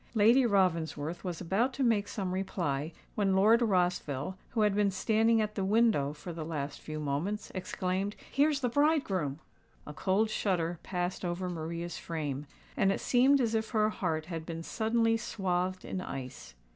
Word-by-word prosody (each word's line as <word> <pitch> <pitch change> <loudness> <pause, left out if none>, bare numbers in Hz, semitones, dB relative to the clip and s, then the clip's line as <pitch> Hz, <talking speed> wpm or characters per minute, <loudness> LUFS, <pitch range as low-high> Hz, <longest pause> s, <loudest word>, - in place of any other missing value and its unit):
Lady 235 +4 +5
Ravensworth 170 -5 0
was 180 -4 -4
about 205 +9 +1
to 270 - -1
make 215 -4 +2
some 195 -3 -3
reply, 170 -6 -2 0.2
when 195 -2 +1
Lord 220 +5 +5
Rossville, 180 - 0
who 225 - -1
had 210 -1 +3
been 205 0 +3
standing 225 +4 +2
at 210 0 -2
the 195 - -2
window 210 -8 +3
for 150 +4 -8
the 165 -1 -5
last 150 -3 -4
few 155 0 -6
moments, 155 +9 -2
exclaimed, 185 +1 -2 0.2
"Here's 285 +1 +2
the 250 - +1
bridegroom!" 230 - +1 0.5
A 150 - -8
cold 200 +7 +1
shudder 175 -5 0
passed 180 0 -3
over 175 +1 -2
Maria's 170 +1 -4
frame; 150 -4 -4 0.3
and 195 - +3
it - - -1
seemed 265 +3 +4
as 230 -3 +1
if 220 0 0
her 215 -2 +2
heart 160 -7 -2
had 165 -2 -5
been 165 0 -6
suddenly 225 +3 +1
swathed 185 -5 -2
in 185 - -3
ice. 130 - -7
190 Hz, 170 wpm, -31 LUFS, 165-220 Hz, 0.5 s, Lady